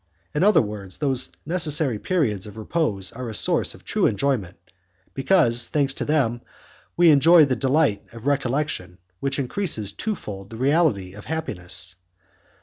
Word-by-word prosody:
In 150 - +1
other 210 - +5
words 100 -3 -7
those 135 -4 -1
necessary 155 - +2
periods 110 - -1
of 105 +1 -11
repose 110 - -2
are 125 0 -6
a 110 - -6
source - - 0
of - - -18
true - - +1
enjoyment, 105 -7 -1 0.6
because, 135 -5 +3
thanks 140 -2 0
to - - -4
them, 125 -6 0 0.6
we 170 -1 +6
enjoy 160 +3 +6
the 130 -2 0
delight 135 -4 +1
of 115 0 -12
recollection 135 - -1 0.2
which 140 0 -2
increases 135 - -2
twofold 105 - -6
the 115 - -9
reality 130 - +1
of 105 +1 -11
happiness. 90 - -3
130 Hz, 145 wpm, -23 LUFS, 105-150 Hz, 0.6 s, we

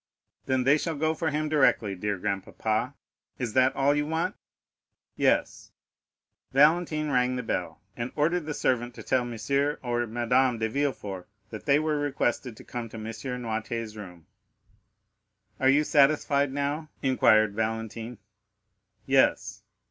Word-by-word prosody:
"Then 130 -1 +1
they 140 +4 +4
shall 165 +1 -2
go 155 +2 +1
for 160 0 -1
him 150 +1 -1
directly, 135 -9 +2
dear 100 +2 -2
grandpapa. 110 +5 -2 0.4
Is 120 -4 -3
that 130 0 +3
all 140 +1 +3
you 145 0 0
want?" 160 +1 -1 0.8
"Yes." - - 0 0.8
Valentine 155 +1 +3
rang 125 -1 +2
the 125 - -3
bell, 90 -7 -3
and 120 +1 -4
ordered 160 +2 +1
the 150 - -3
servant 120 -1 0
to - - -9
tell 130 -1 +1
Monsieur 140 +5 -1
or 120 -1 -1
Madame 120 +2 +1
de 110 0 0
Villefort 110 -8 -3 0.2
that 110 +4 -9
they 140 0 +5
were 155 -1 0
requested 125 -4 -1
to - - -12
come 120 -2 -6
to 110 - -9
M. 110 - -7 0.4
Noirtier's 115 -1 -4
room. 90 -6 -10 1.3
"Are 130 - +4
you 145 +3 +4
satisfied 145 -1 +3
now?" 145 +3 -2
inquired 110 -5 +4
Valentine. 115 +2 -3 0.9
"Yes." - - +2
130 Hz, 140 wpm, -27 LUFS, 110-145 Hz, 1.3 s, they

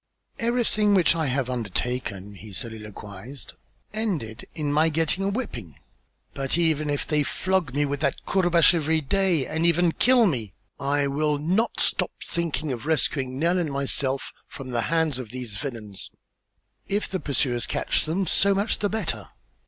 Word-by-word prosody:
"Everything 230 -3 +2
which 175 -3 +4
I 160 -3 0
have 130 -1 0
undertaken," 115 -3 -2
he 105 +2 -11
soliloquized, 105 +3 -7 0.4
"ended 175 - -3
in 145 -2 -1
my 155 +2 +4
getting 165 +4 0
a 195 - +1
whipping. 125 - -4 0.6
But 135 +3 -1
even 155 -3 +2
if 145 -1 -1
they 150 -1 +2
flog 175 -2 0
me 145 0 +3
with 145 0 -2
that 155 - -1
courbash 175 -3 +5
every 160 -1 +2
day 175 -1 +2
and 160 +4 -2
even 170 0 +4
kill 245 +5 +5
me, 115 - -1 0.2
I 140 +1 +1
will 150 +1 +1
not 185 +10 0
stop - - +2 0.2
thinking 160 -3 -1
of 125 +3 -5
rescuing 135 -4 +1
Nell 170 +5 +2
and 160 -4 -1
myself 140 -1 -1
from 130 -2 -8
the 120 -1 +1
hands 160 -5 +1
of 125 -4 -6
these 120 -4 -6
villains. 110 -7 -6 0.8
If 205 +2 0
the 190 - -3
pursuers 130 -5 0
capture - - 0
them, 190 +4 +1
so 195 +3 +3
much 200 +3 0
the 205 - +1
better. 165 - -2
150 Hz, 160 wpm, -25 LUFS, 125-175 Hz, 0.8 s, courbash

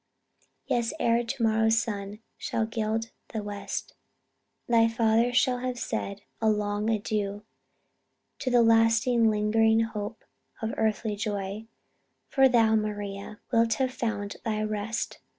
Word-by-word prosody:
Yes, 235 +1 0
ere 235 +1 +2
to 240 +1 -3
morrow's 225 0 +3
sun 210 -2 -3
shall 225 - -2
gild 225 0 -2 0.2
the 220 -2 -4
west, 205 -1 -5 0.7
Thy 230 -1 +5
father 225 +1 +2
shall 250 0 +2
have 250 0 -3
said 200 -4 -4 0.2
a 220 - +3
long 210 0 0
adieu 210 -2 -1 1.0
To 270 - -1
the 245 -1 +5
last 225 +1 +4
lingering 225 -2 +3
hope 215 -1 -4 0.3
of 220 0 -3
earthly 220 -1 0
joy; 205 0 -4 0.6
For 270 -1 +5
thou, 225 -3 +4
Maria, 205 -1 -3
wilt 230 -1 +3
have 260 +1 -1
found 205 -5 -3
thy 215 -2 -1
rest. 215 +1 -3
220 Hz, 130 wpm, -27 LUFS, 210-230 Hz, 1.0 s, Thy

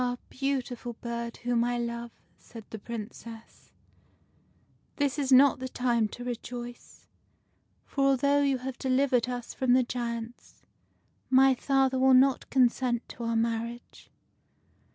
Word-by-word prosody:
beautiful 255 -3 -3
bird, 235 0 -5
whom 240 -1 0
I 245 0 -1
love," 235 0 -4 0.3
said 225 -3 -13
the 220 - -6
Princess, 225 +1 -9 0.6
" - - -38
this 285 0 0
is 275 -2 -1
not 265 0 +6
the 260 0 -5
time 240 -3 +1
to 245 +4 -9
rejoice; 245 0 -7 0.8
for, 275 -1 -1
although 280 +2 +3
you 275 -2 +2
have 255 0 -6
delivered 255 -2 +1
us 245 -1 -5
from 255 -2 +1
the 255 0 +5
giants, 235 -1 -6 0.7
my 265 +1 +6
father 265 0 +1
will 260 0 +5
not 265 +1 +3
consent 250 -2 +1
to 235 - -7
our 230 0 -1
marriage." 230 +1 -3
245 Hz, 135 wpm, -28 LUFS, 235-265 Hz, 0.8 s, not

